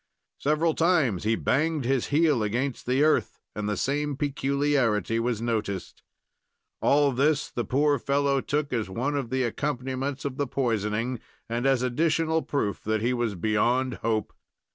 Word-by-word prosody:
Several 155 Hz, +3 st, +1 dB
times 155 Hz, -, +2 dB
he 115 Hz, +1 st, +3 dB
banged 155 Hz, +3 st, 0 dB
his 130 Hz, -1 st, +1 dB
heel 150 Hz, -4 st, +3 dB
against 120 Hz, +6 st, -2 dB
the 130 Hz, +3 st, +3 dB
earth, 155 Hz, -, +1 dB, 0.2 s
and 105 Hz, 0 st, -2 dB
the 105 Hz, -, -1 dB
same 145 Hz, +3 st, -1 dB
peculiarity 140 Hz, -6 st, +1 dB
was 115 Hz, -1 st, -1 dB
noticed. 105 Hz, -5 st, -3 dB, 0.8 s
All 145 Hz, 0 st, +4 dB
this 145 Hz, +4 st, +1 dB
the 120 Hz, -, -2 dB
poor 140 Hz, +5 st, +2 dB
fellow 140 Hz, +1 st, +1 dB
took 145 Hz, -1 st, -2 dB
as 110 Hz, -5 st, -1 dB
one 130 Hz, +9 st, -2 dB
of 135 Hz, -5 st, -2 dB
the 130 Hz, +1 st, 0 dB
accompaniments 135 Hz, +1 st, -3 dB
of 135 Hz, -2 st, -3 dB
the 145 Hz, -, -1 dB
poisoning, 115 Hz, -1 st, -1 dB, 0.3 s
and 120 Hz, +3 st, -1 dB
as 135 Hz, -2 st, +2 dB
additional 160 Hz, +5 st, +1 dB
proof 120 Hz, -11 st, -2 dB
that 110 Hz, 0 st, -1 dB
he 125 Hz, +2 st, +2 dB
was 120 Hz, -4 st, -1 dB
beyond 120 Hz, +7 st, +1 dB
hope. 110 Hz, -2 st, -1 dB
130 Hz, 155 wpm, -26 LUFS, 115-145 Hz, 0.8 s, All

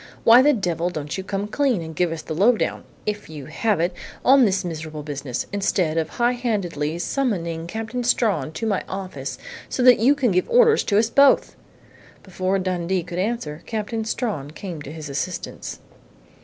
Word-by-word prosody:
"Why 235 Hz, +2 st, +8 dB
the 295 Hz, +3 st, +5 dB
devil 175 Hz, -, -1 dB
don't 150 Hz, -4 st, -5 dB
you 190 Hz, -, -4 dB
come 195 Hz, +1 st, -3 dB
clean 245 Hz, -5 st, +1 dB
and 160 Hz, 0 st, -8 dB
give 175 Hz, +1 st, +1 dB
us 165 Hz, -1 st, -5 dB
the -, -, -5 dB
low 215 Hz, +9 st, +4 dB
down -, -, -2 dB, 0.2 s
if 210 Hz, -3 st, -3 dB
you 150 Hz, -4 st, -8 dB
have 205 Hz, -, 0 dB
it! 175 Hz, +2 st, +1 dB, 0.3 s
on 265 Hz, -1 st, +7 dB
this 190 Hz, -3 st, 0 dB
miserable 155 Hz, -2 st, -5 dB
business, 140 Hz, -4 st, -4 dB
instead, 185 Hz, -5 st, +1 dB
of 160 Hz, -1 st, -2 dB
high 240 Hz, 0 st, +1 dB
handedly 190 Hz, -, -2 dB
summoning 170 Hz, -8 st, -2 dB
Captain 225 Hz, +5 st, -4 dB
Strawn 230 Hz, -8 st, +1 dB
to 225 Hz, -, -4 dB
my 205 Hz, -4 st, 0 dB
office, 145 Hz, -10 st, -5 dB, 0.3 s
so 255 Hz, -, -1 dB
that 250 Hz, -1 st, +7 dB
you 260 Hz, +6 st, +5 dB
can 255 Hz, -6 st, +1 dB
give 185 Hz, 0 st, +1 dB
orders 470 Hz, -2 st, +5 dB
to 200 Hz, -, +2 dB
us 225 Hz, +1 st, +2 dB
both?" 280 Hz, -1 st, +4 dB, 0.7 s
Before 190 Hz, 0 st, -1 dB
Dundee 185 Hz, -1 st, -1 dB
could 175 Hz, +1 st, -5 dB
answer, 185 Hz, -7 st, -2 dB
Captain 220 Hz, 0 st, -3 dB
Strawn 215 Hz, -, -3 dB
came 165 Hz, 0 st, -7 dB
to 145 Hz, -, -8 dB
his 155 Hz, -1 st, -7 dB
assistance. 145 Hz, +6 st, -4 dB
190 Hz, 185 wpm, -23 LUFS, 160-230 Hz, 0.7 s, Why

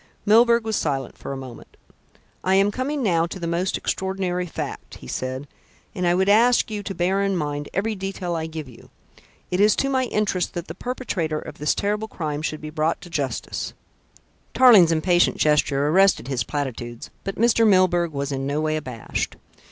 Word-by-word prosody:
Milburgh 235 Hz, +2 st, +5 dB
was 220 Hz, -1 st, -1 dB
silent 135 Hz, -7 st, -2 dB
for -, -, -7 dB
a 135 Hz, -, -4 dB
moment. 130 Hz, -3 st, -11 dB, 0.7 s
"I 190 Hz, +1 st, +3 dB
am 200 Hz, +1 st, +4 dB
coming 265 Hz, +5 st, -2 dB
now 170 Hz, -5 st, +2 dB
to 185 Hz, -, -7 dB
the 170 Hz, -, -4 dB
most 170 Hz, +3 st, -1 dB
extraordinary 185 Hz, -2 st, -2 dB
fact," -, -, -6 dB
he -, -, -13 dB
said, 130 Hz, +2 st, -4 dB, 0.5 s
"and 180 Hz, -2 st, -1 dB
I 175 Hz, -, +3 dB
would 190 Hz, +1 st, +2 dB
ask 230 Hz, +3 st, +4 dB
you 210 Hz, -1 st, -3 dB
to 195 Hz, -1 st, -6 dB
bear 190 Hz, +3 st, +1 dB
in 195 Hz, -1 st, 0 dB
mind 145 Hz, -2 st, -3 dB
every 215 Hz, +3 st, -1 dB
detail 190 Hz, -3 st, -4 dB
I 160 Hz, -1 st, -2 dB
give 160 Hz, -3 st, -7 dB
you. 120 Hz, -2 st, -15 dB, 0.6 s
It 180 Hz, -, 0 dB
is 210 Hz, +1 st, +5 dB
to 275 Hz, -, 0 dB
my 260 Hz, -1 st, +1 dB
interest 210 Hz, -6 st, -1 dB
that 170 Hz, -1 st, -4 dB
the -, -, -6 dB
perpetrator 195 Hz, -11 st, -3 dB
of -, -, -8 dB
this 150 Hz, -, +1 dB
terrible 210 Hz, +2 st, -1 dB
crime 155 Hz, -7 st, -4 dB
should 155 Hz, -1 st, -3 dB
be 155 Hz, 0 st, -7 dB
brought 155 Hz, +1 st, 0 dB
to 175 Hz, -1 st, -12 dB
justice 135 Hz, -6 st, -3 dB, 0.4 s
" -, -, -32 dB
Tarling's 225 Hz, -10 st, +7 dB
impatient 175 Hz, +2 st, +3 dB
gesture 145 Hz, -2 st, +2 dB
arrested 190 Hz, -5 st, +4 dB
his 125 Hz, -4 st, 0 dB
platitudes, 120 Hz, -3 st, -5 dB
but 195 Hz, -, -4 dB
Mr. 230 Hz, 0 st, +4 dB
Milburgh 180 Hz, -4 st, +3 dB
was 140 Hz, -1 st, -3 dB
in 135 Hz, 0 st, -2 dB
no 145 Hz, +2 st, -1 dB
way 155 Hz, 0 st, 0 dB
abashed. 125 Hz, -6 st, -4 dB
175 Hz, 190 wpm, -23 LUFS, 150-200 Hz, 0.7 s, Tarling's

